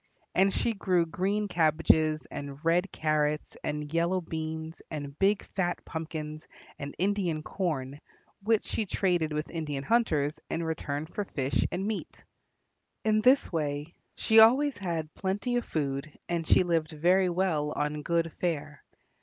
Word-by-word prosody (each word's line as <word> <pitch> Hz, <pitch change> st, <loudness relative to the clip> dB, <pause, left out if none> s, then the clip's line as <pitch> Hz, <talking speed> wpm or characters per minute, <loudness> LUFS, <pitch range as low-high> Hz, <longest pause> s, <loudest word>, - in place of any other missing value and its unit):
And 195 Hz, +1 st, +4 dB
she 230 Hz, -, 0 dB
grew 185 Hz, -4 st, +2 dB
green 195 Hz, +6 st, -1 dB
cabbages 155 Hz, -2 st, +3 dB
and 140 Hz, +2 st, -7 dB
red 175 Hz, +4 st, +2 dB
carrots 150 Hz, -1 st, 0 dB
and 150 Hz, 0 st, -3 dB
yellow 170 Hz, +3 st, +2 dB
beans 160 Hz, -1 st, -5 dB
and 145 Hz, -3 st, -5 dB
big 200 Hz, +1 st, +3 dB
fat 175 Hz, -2 st, -1 dB
pumpkins 155 Hz, -1 st, -5 dB, 0.3 s
and 140 Hz, 0 st, -6 dB
Indian 185 Hz, -5 st, 0 dB
corn, 145 Hz, -7 st, -3 dB, 0.4 s
which 220 Hz, +1 st, +2 dB
she 215 Hz, -, -2 dB
traded 175 Hz, -5 st, +1 dB
with 150 Hz, 0 st, -3 dB
Indian 150 Hz, -5 st, -3 dB
hunters 155 Hz, -10 st, +1 dB
in 165 Hz, -, -1 dB
return 155 Hz, -2 st, -3 dB
for 190 Hz, +5 st, -4 dB
fish 135 Hz, -7 st, 0 dB
and 185 Hz, +2 st, -2 dB
meat. 215 Hz, 0 st, -4 dB, 0.8 s
In 215 Hz, 0 st, +3 dB
this 255 Hz, +5 st, +4 dB
way 150 Hz, 0 st, -2 dB, 0.2 s
she 220 Hz, 0 st, +5 dB
always 260 Hz, +6 st, +6 dB
had 165 Hz, -5 st, -3 dB
plenty 200 Hz, +6 st, -1 dB
of 240 Hz, -, -1 dB
food, 140 Hz, -1 st, -3 dB
and 170 Hz, -2 st, -2 dB
she -, -, +5 dB
lived 165 Hz, -3 st, +1 dB
very 180 Hz, +4 st, +3 dB
well 170 Hz, -5 st, 0 dB
on 150 Hz, 0 st, -2 dB
good 165 Hz, +1 st, 0 dB
fare. 150 Hz, -5 st, -2 dB
165 Hz, 145 wpm, -29 LUFS, 150-190 Hz, 0.8 s, always